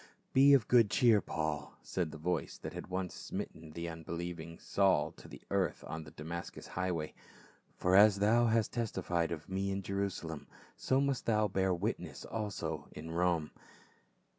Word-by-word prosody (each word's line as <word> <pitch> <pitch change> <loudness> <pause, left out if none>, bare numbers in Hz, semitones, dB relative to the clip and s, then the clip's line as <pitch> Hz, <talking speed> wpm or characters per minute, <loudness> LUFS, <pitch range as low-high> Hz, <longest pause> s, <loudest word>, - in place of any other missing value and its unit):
"Be 140 +1 +8
of 120 -5 +2
good 115 -4 +6
cheer, 115 -4 +5
Paul," 80 -3 -3
said 90 -4 -2
the 80 - -8
voice 85 +2 -2
that - - -7
had - - -6
once 95 0 -3
smitten 80 -1 -6
the 85 +1 -4
unbelieving 85 0 -5
Saul 95 -1 +2
to - - -14
the - - -12
earth 95 -4 0
on 80 -1 -5
the - - -10
Damascus 85 +3 -7
highway, 85 -4 -2 0.3
" - - -30
for 90 +1 +3
as 100 0 +8
thou 115 +4 +4
hast 115 -1 +2
testified 90 -7 -1
of 80 -2 -5
me 95 +1 -1
in 95 0 -2
Jerusalem, 95 -6 -3 0.3
so 130 - +1
must 140 -2 -1
thou 110 -2 +3
bear 95 -1 +1
witness 90 - -3
also 105 -2 -4
at - - -7
Rome." 85 -2 +1
95 Hz, 165 wpm, -33 LUFS, 85-105 Hz, 0.3 s, Be